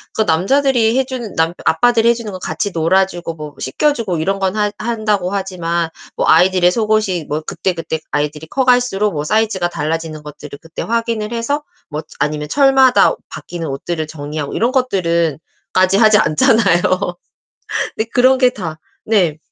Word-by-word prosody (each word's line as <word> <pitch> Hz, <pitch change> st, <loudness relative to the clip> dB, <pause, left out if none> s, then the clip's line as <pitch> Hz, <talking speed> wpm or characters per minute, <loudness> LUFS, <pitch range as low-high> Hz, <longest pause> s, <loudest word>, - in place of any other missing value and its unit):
그 220 Hz, -, +2 dB
남자들이 230 Hz, -, +2 dB
해주는 255 Hz, -5 st, -4 dB
남 165 Hz, +1 st, +1 dB
아빠들이 235 Hz, -1 st, +3 dB
해 -, -, +5 dB
주는 230 Hz, -3 st, -6 dB
거 185 Hz, -, -6 dB
같이 205 Hz, +2 st, -3 dB
놀아주고 175 Hz, 0 st, 0 dB
뭐 150 Hz, -2 st, -8 dB
씻겨주고 220 Hz, -, 0 dB
이런 195 Hz, +5 st, -1 dB
건 190 Hz, +1 st, 0 dB
한 210 Hz, -1 st, +1 dB
한다고 215 Hz, -4 st, -1 dB
하지만 175 Hz, -4 st, -2 dB, 0.3 s
뭐 -, -, 0 dB
아이들의 180 Hz, +2 st, +5 dB
속옷이 215 Hz, -6 st, 0 dB
뭐 150 Hz, +1 st, -1 dB
그때그때 165 Hz, -1 st, -3 dB
아이들이 150 Hz, +1 st, -2 dB
커갈수록 245 Hz, -4 st, +2 dB
뭐 145 Hz, -1 st, -2 dB
사이즈가 200 Hz, 0 st, 0 dB
달라지는 160 Hz, -1 st, -4 dB
것들을 150 Hz, -1 st, -10 dB
그때 165 Hz, 0 st, -7 dB
확인을 230 Hz, -1 st, -2 dB
해서 260 Hz, +6 st, -2 dB, 0.3 s
뭐 150 Hz, +1 st, -4 dB, 0.2 s
아니면 150 Hz, +1 st, -2 dB
철마다 270 Hz, -2 st, +5 dB, 0.2 s
바뀌는 170 Hz, -2 st, -7 dB
옷들을 155 Hz, +4 st, -4 dB
정리하고 150 Hz, -1 st, -5 dB
이런 235 Hz, +3 st, +1 dB
것들은 170 Hz, -, +1 dB, 0.4 s
까지 185 Hz, +1 st, +3 dB
하지 215 Hz, -2 st, +6 dB
않잖아요. 175 Hz, +2 st, +3 dB, 1.2 s
근데 220 Hz, +1 st, -2 dB
그런 255 Hz, +1 st, +4 dB
게 255 Hz, -1 st, +4 dB
다 175 Hz, -10 st, -6 dB, 0.3 s
네. 180 Hz, -8 st, +2 dB
190 Hz, 355 characters per minute, -17 LUFS, 160-230 Hz, 1.2 s, 하지